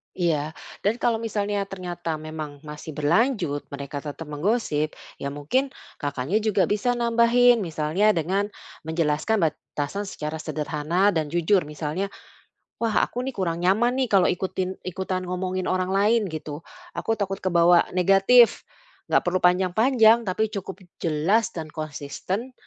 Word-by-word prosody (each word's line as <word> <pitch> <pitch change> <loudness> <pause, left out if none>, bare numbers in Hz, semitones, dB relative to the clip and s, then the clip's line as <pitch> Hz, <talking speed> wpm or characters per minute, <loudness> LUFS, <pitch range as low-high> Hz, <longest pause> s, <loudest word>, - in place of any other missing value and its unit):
Iya, 160 -3 0 0.3
dan 210 +3 +3
kalau 230 -2 +2
misalnya 205 -3 -2
ternyata 175 -4 -4
memang 155 -2 -7
masih 150 0 -8
berlanjut 165 - +1
mereka 140 0 -5
tetap 145 +2 -7
menggosip, 155 -2 -1 0.2
ya - - -3
mungkin 155 - 0 0.3
Kakaknya 145 +6 -1
juga 210 -3 +2
bisa 230 +4 +1
nambahin 235 +1 +4
misalnya 170 +3 +1
dengan 190 +5 0 0.4
menjelaskan 160 +4 +1
batasan 150 +8 -5
secara 155 -3 -5
sederhana 155 +5 0
dan 160 -4 0
jujur 175 +1 +2
misalnya, 150 +5 -3 0.7
"Wah 225 -2 +1
aku 245 - -2
nih 265 - -2
kurang 170 -3 -1
nyaman 230 +7 +3
nih 260 -2 +1
kalau 190 -2 +5
ikutin 185 0 -2
ikutan 185 0 -3
ngomongin 185 +1 -2
orang 185 0 0
lain," 210 +4 +3
gitu, 150 -1 -6 0.3
"Aku 225 - -1
takut 195 -1 -2
kebawa 175 -1 +4
negatif," 195 +6 +5 0.5
gak - - +3
perlu 185 +1 0
panjang-panjang 220 +6 +4
tapi 215 +4 0
cukup 195 -2 -6 0.2
jelas 170 +8 +2
dan 160 -8 -7
konsisten 155 - -5
185 Hz, 135 wpm, -24 LUFS, 155-210 Hz, 0.7 s, kalau